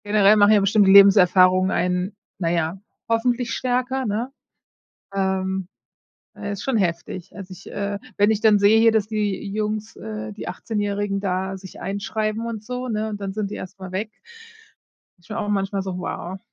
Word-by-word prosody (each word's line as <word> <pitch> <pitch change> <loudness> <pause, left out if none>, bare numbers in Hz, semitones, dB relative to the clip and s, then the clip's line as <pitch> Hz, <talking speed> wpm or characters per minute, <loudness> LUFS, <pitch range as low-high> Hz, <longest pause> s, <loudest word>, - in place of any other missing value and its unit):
Generell 205 0 +5
machen 205 0 +6
ja 210 - +6
bestimmt 200 +1 +3
die 190 - +6
Lebenserfahrungen 185 -1 +6
einen, 180 +2 -1 0.2
naja, 170 0 -1 0.3
hoffentlich 235 +1 0
stärker, 255 +1 -1
ne? 225 +5 -2 0.8
Ähm, 190 -1 -1 0.7
ja 205 - -5
ist 200 - -6
schon 265 -4 0
heftig. 180 -1 -3
Als 195 -2 -9
ich, 185 +1 -11
äh 200 0 -3 0.2
wenn 205 +1 +3
ich 215 - 0
dann 215 -1 +5
sehe 205 +2 +5
hier, 225 0 +5
dass 215 -2 +1
die 205 -2 -2
Jungs 215 +1 -3
äh, 110 0 -6
die - - -8
Achtzehnjährigen, 205 0 -2
da 190 0 -2
sich 190 -1 -12
einschreiben 215 +3 -2
und 220 -2 -5
so, 250 +2 -5
ne, 220 -2 -2
und 205 -1 -5
dann 195 -1 -4
sind 205 -1 -3
die - - -4
erst 190 +2 -9
mal 185 -1 -8
weg, 210 +4 -3 1.1
ist 175 - -23
schon 215 - -6
auch 210 -2 -2
manchmal 195 -1 -1
so: 190 -1 -5
„Wow", 180 +1 -5
200 Hz, 180 wpm, -22 LUFS, 190-215 Hz, 1.1 s, machen